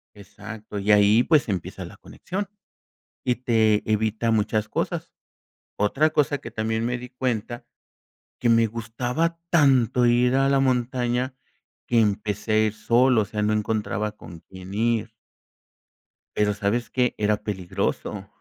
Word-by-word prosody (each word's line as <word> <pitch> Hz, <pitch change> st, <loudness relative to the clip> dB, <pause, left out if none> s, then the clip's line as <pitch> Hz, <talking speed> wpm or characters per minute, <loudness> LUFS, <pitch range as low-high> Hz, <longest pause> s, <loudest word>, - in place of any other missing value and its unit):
Exacto, 105 Hz, +1 st, -9 dB
y 105 Hz, +2 st, +1 dB
ahí 105 Hz, +3 st, +5 dB
pues 150 Hz, -8 st, +3 dB
empieza 90 Hz, -4 st, -4 dB
la -, -, -12 dB
conexión, 195 Hz, +2 st, -6 dB, 0.8 s
y 125 Hz, -1 st, +2 dB
te 110 Hz, -4 st, +2 dB
evita 110 Hz, +2 st, 0 dB
muchas 110 Hz, 0 st, 0 dB
cosas. -, -, -3 dB, 0.6 s
Otra 140 Hz, +10 st, +2 dB
cosa 145 Hz, -1 st, +1 dB
que 115 Hz, -, -8 dB
también 110 Hz, 0 st, -2 dB
me 125 Hz, 0 st, -1 dB
di 125 Hz, 0 st, -9 dB
cuenta 120 Hz, -2 st, -3 dB, 0.7 s
que 120 Hz, -, +1 dB
me 115 Hz, 0 st, +5 dB
gustaba 120 Hz, +9 st, -2 dB
tanto 130 Hz, -6 st, +4 dB
ir 125 Hz, +1 st, +3 dB
a 135 Hz, 0 st, +3 dB
la 135 Hz, -1 st, +3 dB
montaña 125 Hz, 0 st, 0 dB, 0.5 s
que 120 Hz, -1 st, +3 dB
empecé 105 Hz, 0 st, 0 dB
a 110 Hz, 0 st, +4 dB
ir 105 Hz, -, -3 dB
solo, 120 Hz, +2 st, +3 dB
o -, -, -7 dB
sea, 105 Hz, +1 st, -4 dB
no 105 Hz, -, +1 dB
encontraba 105 Hz, 0 st, -1 dB
con 85 Hz, -4 st, -12 dB
quién 95 Hz, +1 st, -11 dB
ir. 115 Hz, 0 st, 0 dB, 1.2 s
Pero, 105 Hz, 0 st, +2 dB
¿sabes 105 Hz, +4 st, -1 dB
qué? 125 Hz, -2 st, +1 dB
Era 105 Hz, 0 st, +1 dB
peligroso. 95 Hz, -5 st, -3 dB
115 Hz, 145 wpm, -24 LUFS, 105-125 Hz, 1.2 s, ahí